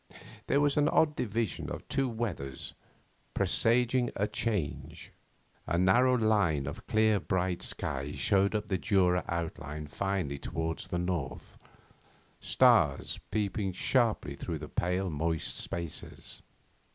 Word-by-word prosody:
There 140 - +3
was 145 -1 +3
this 150 0 +3
odd 150 -2 +3
division 115 -2 -2
of - - -7
two 135 -1 0
weathers, 100 - -4 0.6
presaging 125 +2 +2
a 105 - 0
change. 105 -12 -3 0.6
A 85 - +1
narrow 120 +8 +4
line 105 - +2
of 70 - -7
clear 110 -2 +3
bright 90 +1 -1
sky 70 +1 -3
showed 100 +1 +2
up 105 0 -1
the 95 -3 -1
Jura 90 -1 +2
outline 75 -3 -4
finely 85 -3 -2
towards 80 +2 -4
the 90 - -2
north, 85 -6 -4 0.8
stars - - +3
peeping 100 -2 -1
sharply 110 - +1
through - - -4
the - - -7
pale 90 +1 -1
moist 80 +1 -1
spaces. 85 -3 -5
95 Hz, 125 wpm, -30 LUFS, 80-110 Hz, 0.8 s, narrow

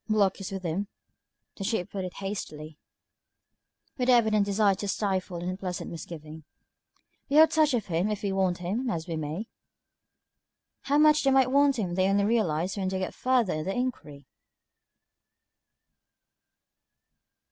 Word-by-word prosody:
"Block 200 -2 +2
is 195 - -5
with 195 -1 -5
him," 180 +4 -2 0.7
the 195 - -5
Chief 195 -3 -1
put 195 -2 -4
in 185 - -3
hastily, 160 -6 -6 1.2
with 250 - 0
the 255 - +6
evident 215 -3 +3
desire 200 0 +3
to 200 +2 -5
stifle 190 -3 -1
an 175 +1 -5
unpleasant 185 -1 -4
misgiving. 160 -1 -9 0.9
"We 280 - 0
have 315 +1 +7
touch 310 -4 +3
of 225 - -2
him 175 +4 0
if 210 -1 -3
we 200 - 0
want 190 -2 +1
him, 210 +9 -2
as 165 -6 -3
we 165 - -3
may." 155 +7 -4 1.4
How 285 +1 +2
much 305 0 +5
they 275 - +3
might 265 -1 +4
want 280 -1 +4
him 185 -6 -2
they 185 +1 +2
only 200 0 +2
realized 190 -5 0
when 190 -1 -1
they 190 0 -1
got 185 0 -3
further 250 -6 +1
in 155 0 -3
their 195 - -2
inquiry! 155 - -4
195 Hz, 160 wpm, -27 LUFS, 175-230 Hz, 1.4 s, have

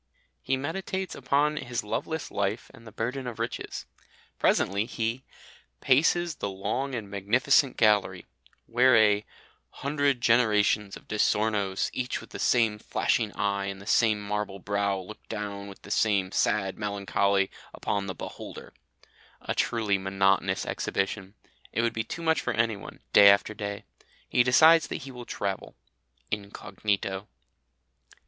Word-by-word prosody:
He 135 - 0
meditates 185 +6 -3
upon 145 +3 +1
his 120 -4 -3
loveless 160 +9 -3
life 100 +2 -2
and 115 - -15
the - - -10
burthen 125 +5 -3
of 120 - -6
riches. 115 +1 -4 0.5
Presently 100 +3 +2
he 120 +1 -2 0.6
"paces 165 +5 +2
the 100 - -3
long 125 +8 -3
and 110 -4 -5
magnificent 125 +8 +2
gallery," 105 -5 +2 0.4
where 120 +1 +4
a 105 -1 +4 0.5
"hundred 140 -2 0
generations 105 -3 +2
of - - -19
Di 110 - -3
Sornos, 105 -3 +1
each 125 0 -2
with - - -13
the - - -7
same 110 -4 +2
flashing 110 0 0
eye 100 -1 -1
and 100 0 -5
the 100 - -12
same 110 -1 +3
marble 105 -1 -3
brow, 100 0 -1
look 95 +3 -10
down 100 -2 -5
with 100 - -12
the 100 - -10
same 100 -4 +2
sad 100 -2 0
melancholy 100 -1 +1 0.2
upon 100 -1 -2
the 95 - -4
beholder" - - -9 0.7
a - - -3
truly 105 -4 +1
monotonous 95 0 +1
exhibition. 95 0 -3 0.4
It 115 - 0
would 115 -1 +1
be 110 - -2
too 170 - -7
much 160 -1 +2
for 125 - -2
anyone, 115 -3 -2
day 100 -1 +9
after 100 +2 +3
day. 100 -1 -5 0.4
He - - +3
decides 160 +6 +6
that - - -5
he 135 - -8
will 125 -1 -9
travel. 100 -1 -4 0.6
Incognito. 100 -1 -3
105 Hz, 145 wpm, -27 LUFS, 100-125 Hz, 0.7 s, day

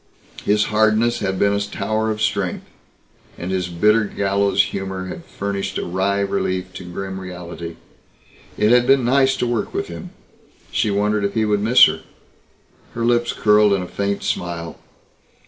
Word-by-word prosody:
His 105 0 +3
hardness 110 +2 +3
had 95 0 -2
been 100 +1 +2
a 100 - +1
tower 110 +2 -2
of 110 0 -2
strength. 100 -3 -1 0.7
And 90 +2 -5
his 90 -2 -1
bitter 105 +6 +3
gallows 100 0 +1
humor 95 -1 -5
had - - -7
furnished 100 -1 -4
a - - -2
wry 95 +3 0
relief 95 -2 -2
to - - -8
grim 95 +1 -5
reality. 85 -2 -7 0.8
It 105 +1 +3
had 125 0 +4
been 135 -2 +4
nice 135 +1 +3
to - - 0
work 120 -2 -2
with - - -2
him. - - -8 0.6
She - - +1
wondered 105 +1 +1
if 100 0 -2
he 110 -1 +2
would 105 -1 +1
miss 115 +4 +7
her. - - -2 0.9
Her 115 0 -1
lips 120 0 +2
curled 105 -1 +4
in 95 -2 0
a - - -7
faint 100 +1 -2
smile. 85 -2 -3
100 Hz, 165 wpm, -20 LUFS, 95-110 Hz, 0.9 s, miss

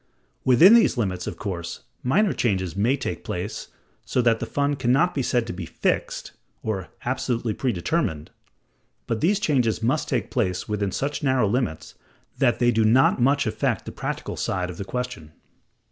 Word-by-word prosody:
Within 130 - +7
these 230 - +5
limits, 95 -6 -2
of - - -5
course, 85 -4 -5 0.2
minor 190 +11 +2
changes 95 -7 -1
may 115 +8 +2
take 90 -10 -4
place, 90 +5 -4 0.4
so - - -1
that 115 -1 +3
the - - -4
fund 145 0 0
can 125 -2 +1
not 175 +7 +3
be 140 - -1
said 120 -2 +1
to 115 - -5
be 90 -2 -6
"fixed" - - -2 0.3
or 100 -5 -3 0.2
"absolutely 125 -3 -1
predetermined"; 110 - -1 0.7
but 115 -1 -2
these 195 +5 +3
changes 125 - +1
must 130 +7 0
take 120 -4 -1
place 95 -7 -1
within 105 -2 -1
such 140 +8 -2
narrow 130 -6 +2
limits 100 -9 -2 0.5
that 125 -4 +3
they 120 0 +3
do 110 -1 +2
not 120 +3 +4
much 140 +3 +3
affect 110 - -1
the - - -6
practical - - -4
side 90 -2 -2
of 85 - -11
the 100 - -5
question. 125 -10 -5
120 Hz, 175 wpm, -24 LUFS, 100-135 Hz, 0.7 s, Within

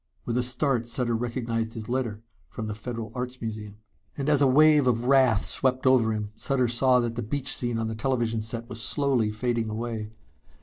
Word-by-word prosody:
With 120 - -2
a 125 - +2
start 125 -1 0
Sutter 120 -1 -1
recognized 115 -1 -2
his 110 -2 -6
letter 120 -4 -2 0.3
from 110 - -6
the 105 - -3
Federal 115 +1 -6
Arts 125 0 -5
Museum. 105 -2 -6 0.4
And 140 +1 -1
as 145 -1 +4
a 140 - +6
wave 150 +1 +5
of 120 -1 +1
wrath 130 -5 +4
swept 130 -1 +1
over 125 -4 +4
him, 105 -1 -3
Sutter 130 -1 0
saw 125 +2 +3
that 120 -1 -2
the 120 - -3
beach 135 +4 -2
scene 120 -2 -2
on 115 - -1
the 110 - -3
television 115 -1 -1
set 115 +1 -4
was 115 -1 -5
slowly 130 -3 +2
fading 115 +1 -1
away. 110 -1 -4
120 Hz, 200 wpm, -26 LUFS, 110-130 Hz, 0.4 s, a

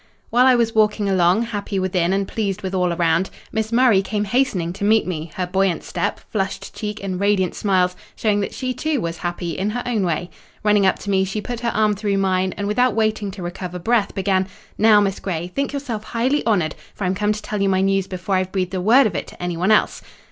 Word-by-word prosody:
While 250 +2 +5
I 255 - +6
was 230 -2 +1
walking 210 -1 +2
along, 185 +2 +3
happy 205 -3 -4
within, 185 -2 +1
and 195 0 0
pleased 200 -4 -3
with 190 0 -3
all 180 -2 +1
around, 170 +2 +1 0.2
Miss 220 0 -2
Murray 235 -5 +4
came 205 +2 -2
hastening 200 -7 0
to 200 - -7
meet 215 +2 +4
me; 165 -3 -4
her 185 - -1
buoyant 190 0 0
step, - - -2
flushed 195 -3 -3
cheek, 210 -1 -5
and 185 -2 -3
radiant 200 -3 +2
smiles 185 -3 +1 0.2
showing 210 -2 +1
that 200 - -2
she, 255 -1 -3
too, 300 +3 -1
was 170 -4 -3
happy, 175 -1 -3
in 195 +2 -1
her 245 +3 -3
own 230 -5 0
way. 175 0 -2 0.3
Running 210 -2 +4
up - - +2
to 200 - -4
me, 190 -1 +3
she 190 +3 -3
put 240 +2 -5
her 235 -1 -1
arm 215 -2 +2
through 200 -1 -1
mine, 190 -1 +1
and 205 - -2
without 240 +2 +2
waiting 215 -2 0
to 190 -1 -8
recover 180 0 -5
breath, 210 +3 +1
began—"Now, 195 +2 +2
Miss 195 -1 -1
Grey, 175 -2 -4
think 280 0 -1
yourself 265 -7 -4
highly 255 +7 0
honoured, 180 -8 +2 0.2
for - - -5
I'm 180 0 +1
come 210 +2 0
to 210 0 -3
tell 210 -4 -3
you 200 - +2
my 190 0 +2
news 195 0 +1
before 185 +1 -2
I've 185 0 -1
breathed 185 -1 -2
a 185 - -1
word 245 +8 +6
of 210 - 0
it - - -3
to - - -10
anyone 175 +2 -1
else." 215 - +3
195 Hz, 230 wpm, -21 LUFS, 185-220 Hz, 0.3 s, I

